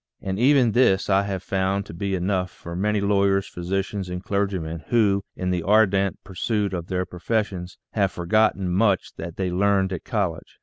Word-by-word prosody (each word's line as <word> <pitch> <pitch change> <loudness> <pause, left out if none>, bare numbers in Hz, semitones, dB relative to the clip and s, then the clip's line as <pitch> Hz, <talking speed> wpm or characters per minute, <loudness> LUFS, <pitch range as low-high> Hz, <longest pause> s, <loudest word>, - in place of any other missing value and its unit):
And 95 +1 -3
even 130 -2 +4
this 100 -5 +3
I 95 +1 +5
have 95 -2 -4
found 95 +1 0
to 80 - -10
be 95 +3 -2
enough 90 0 0
for 85 -1 -9
many 105 +3 +1
lawyers, 100 -1 +2
physicians, 95 +2 -3
and 90 +1 -5
clergymen 95 -6 -2
who, 100 -4 +2
in 90 0 -2
the 90 -1 0
ardent 100 0 +2
pursuit 100 +1 -2
of 85 -2 -4
their 90 0 -1
profes 105 +6 -1
sions, 90 -3 -8
have 100 -3 +1
forgotten 95 +1 +1
much 100 0 +1
that 85 0 -6
they 95 -2 -1
learned 95 0 +2
at 90 - -5
college. 95 -8 -3
95 Hz, 180 wpm, -24 LUFS, 90-100 Hz, -, I